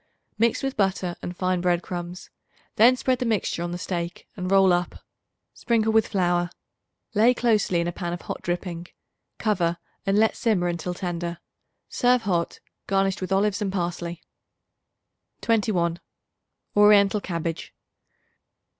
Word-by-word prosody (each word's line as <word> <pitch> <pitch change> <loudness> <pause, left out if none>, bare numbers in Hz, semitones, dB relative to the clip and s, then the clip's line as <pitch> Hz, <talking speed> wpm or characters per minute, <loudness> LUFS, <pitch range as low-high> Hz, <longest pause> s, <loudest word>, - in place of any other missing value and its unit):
Mix 230 +3 +2
with 270 0 -2
butter 190 -3 0
and 175 0 -6
fine 185 -1 0
bread 175 -1 +1
crumbs; 175 0 -6 0.4
then 240 +4 +6
spread 255 -1 0
the - - 0
mixture 210 -6 0
on 175 - -2
the 175 - -4
steak, 170 -1 -4
and 185 -2 -4
roll 195 -1 +5
up. 175 0 -2 0.5
Sprinkle 225 -2 +1
with 220 -1 +4
flour; 175 -2 +1 0.6
lay 225 +4 +4
closely 215 -7 +2
in 170 - -1
a - - -1
pan 175 -1 -4
of 175 - -5
hot - - -5
dripping; 175 -1 -4 0.5
cover 175 -6 0 0.3
and 195 +1 +1
let 220 +1 +3
simmer 200 -7 +1
until 175 +1 -3
tender. 175 -2 -3 0.5
Serve 245 -1 +2
hot, 175 -5 -1 0.3
garnished 195 -1 +1
with 185 - -4
olives 200 +2 +2
and 200 -2 -1
parsley. 175 -2 -3 1.2
21. 190 -7 +1 0.8
Oriental 205 0 +5
Cabbage. 170 -3 -4
185 Hz, 140 wpm, -25 LUFS, 175-210 Hz, 1.2 s, then